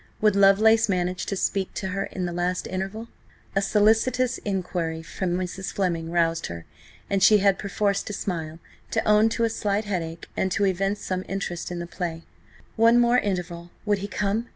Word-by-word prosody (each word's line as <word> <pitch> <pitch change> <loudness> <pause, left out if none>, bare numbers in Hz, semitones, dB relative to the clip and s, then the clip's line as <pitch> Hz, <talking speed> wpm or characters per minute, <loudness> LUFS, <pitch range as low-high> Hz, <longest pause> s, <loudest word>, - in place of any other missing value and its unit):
Would 210 -2 +3
Lovelace 215 +3 +5
manage 180 -1 -1
to 195 - -1
speak 190 0 -1
to 190 - -3
her 195 +1 -2
in 185 - -4
the 175 - -3
last 180 +1 -1
interval? 195 +5 -4 0.5
A 195 - +3
solicitous 225 +5 +2
enquiry 175 -5 -3
from 175 +1 -2
Mrs. 185 +1 -4
Fleming 170 -4 -1
roused 165 -1 +1
her, 85 -1 -8 0.4
and 195 -1 0
she 210 +2 +7
had 200 -1 +3
perforce 200 0 0
to - - -5
smile–to 170 +4 -4
own 215 +1 +5
to 230 - -1
a 230 - +3
slight 210 -1 -1
headache, 170 -5 -4
and 190 - 0
to 200 - +2
evince 195 +2 0
some 185 0 -3
interest 190 -3 -4
in 175 - -5
the 170 - -4
play. 170 -2 -5 0.5
One 230 +2 +6
more 240 +1 +4
interval: 175 -4 -3 0.2
would 205 -2 +1
he 200 - -4
come? 210 +3 -1
195 Hz, 180 wpm, -25 LUFS, 175-210 Hz, 0.5 s, she